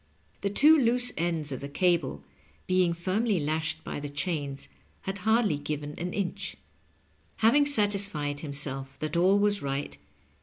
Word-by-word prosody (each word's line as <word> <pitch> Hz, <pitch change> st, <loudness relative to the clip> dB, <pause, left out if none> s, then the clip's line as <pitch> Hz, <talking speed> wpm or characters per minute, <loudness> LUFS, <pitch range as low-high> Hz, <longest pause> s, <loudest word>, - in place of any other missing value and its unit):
The 200 Hz, -, 0 dB
two 300 Hz, +9 st, +6 dB
loose 245 Hz, 0 st, +3 dB
ends 165 Hz, -3 st, -1 dB
of 130 Hz, -, -5 dB
the 140 Hz, -, -6 dB
cable, 155 Hz, -, 0 dB, 0.4 s
being 185 Hz, -1 st, +2 dB
firmly 190 Hz, +4 st, 0 dB
lashed 155 Hz, +1 st, -2 dB
by -, -, -5 dB
the 145 Hz, 0 st, -5 dB
chains, 145 Hz, -2 st, -3 dB, 0.3 s
had 195 Hz, +1 st, -5 dB
hardly 220 Hz, -5 st, +2 dB
given 150 Hz, 0 st, -4 dB
an 180 Hz, +1 st, -3 dB
inch. 195 Hz, -2 st, -3 dB, 0.8 s
Having 265 Hz, +7 st, +4 dB
satisfied 200 Hz, -, +1 dB
himself 135 Hz, -2 st, -3 dB
that 155 Hz, +1 st, -4 dB
all 185 Hz, +4 st, +4 dB
was 205 Hz, 0 st, +2 dB
right. 135 Hz, -, -3 dB
170 Hz, 145 wpm, -28 LUFS, 145-205 Hz, 0.8 s, two